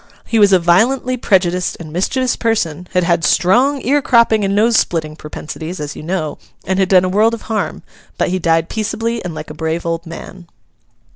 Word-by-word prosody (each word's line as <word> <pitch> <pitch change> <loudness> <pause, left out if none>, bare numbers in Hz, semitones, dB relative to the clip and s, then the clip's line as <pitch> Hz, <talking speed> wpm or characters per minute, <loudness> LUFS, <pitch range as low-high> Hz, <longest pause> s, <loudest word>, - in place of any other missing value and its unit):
He 225 - 0
was 205 -1 +5
a 190 - +7
violently 230 +10 +2
prejudiced 180 -6 +1
and 155 -2 -9
mischievous 250 +8 0
person; 180 -7 -1
had 180 -1 +2
had 170 -1 +1
strong 245 - +3
ear 285 +3 +2
cropping 235 -4 +3
and 195 0 0
nose 225 +3 +3
splitting 155 -6 0
propensities, 155 +3 -7
as 150 -1 -5
you - - -8
know; 155 -2 -3 0.3
and 190 +2 -1
had 190 -1 +2
done 185 -2 +5
a - - 0
world 215 +5 +2
of 230 - -12
harm. 220 -1 -3 0.3
But - - 0
he 185 +1 -1
died 165 -1 +1
peaceably, 225 +2 -3
and 175 -3 -5
like - - -7
a - - -7
brave 160 +2 -3
old 165 0 -3
man. 175 +1 -10
185 Hz, 200 wpm, -17 LUFS, 165-225 Hz, 0.3 s, a